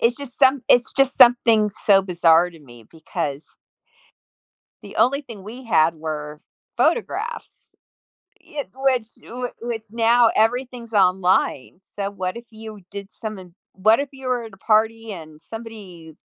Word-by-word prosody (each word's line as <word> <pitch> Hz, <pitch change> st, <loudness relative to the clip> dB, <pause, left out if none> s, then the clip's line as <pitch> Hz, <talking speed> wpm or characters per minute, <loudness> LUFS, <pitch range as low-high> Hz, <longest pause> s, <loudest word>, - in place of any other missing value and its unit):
it's 235 Hz, +1 st, +2 dB
just 280 Hz, -4 st, -10 dB
some 265 Hz, -2 st, +4 dB
it's 245 Hz, -1 st, +4 dB
just 270 Hz, 0 st, +2 dB
something 235 Hz, -4 st, +5 dB, 0.2 s
so 195 Hz, -2 st, +6 dB
bizarre 175 Hz, -2 st, +3 dB
to 165 Hz, -, -15 dB
me 120 Hz, -6 st, -16 dB
because 155 Hz, -2 st, -5 dB, 1.4 s
the -, -, -12 dB
only 275 Hz, +3 st, +2 dB
thing 230 Hz, -8 st, -11 dB
we 235 Hz, +6 st, -9 dB
had 165 Hz, -8 st, +3 dB
were 150 Hz, -1 st, -6 dB, 0.4 s
photographs, 470 Hz, 0 st, -2 dB, 0.7 s
if 290 Hz, -2 st, -7 dB
which 260 Hz, -4 st, +1 dB
whi 245 Hz, +1 st, -6 dB
which 230 Hz, -2 st, -4 dB
now, 230 Hz, +1 st, +4 dB
everything's 240 Hz, +1 st, 0 dB
online. 185 Hz, -5 st, +1 dB
So, 200 Hz, -1 st, -2 dB
what 185 Hz, +1 st, -4 dB
if 235 Hz, -, -11 dB
you 220 Hz, -2 st, -11 dB
did 200 Hz, -1 st, -7 dB
something 195 Hz, -6 st, -8 dB, 0.2 s
what 215 Hz, +5 st, +4 dB
if 280 Hz, -1 st, -3 dB
you 265 Hz, -1 st, -9 dB
were 250 Hz, -2 st, 0 dB
at 225 Hz, -3 st, -11 dB
a -, -, -14 dB
party 225 Hz, +2 st, +1 dB
and 155 Hz, -4 st, -10 dB
somebody 200 Hz, -7 st, -10 dB
220 Hz, 150 wpm, -22 LUFS, 180-245 Hz, 1.4 s, so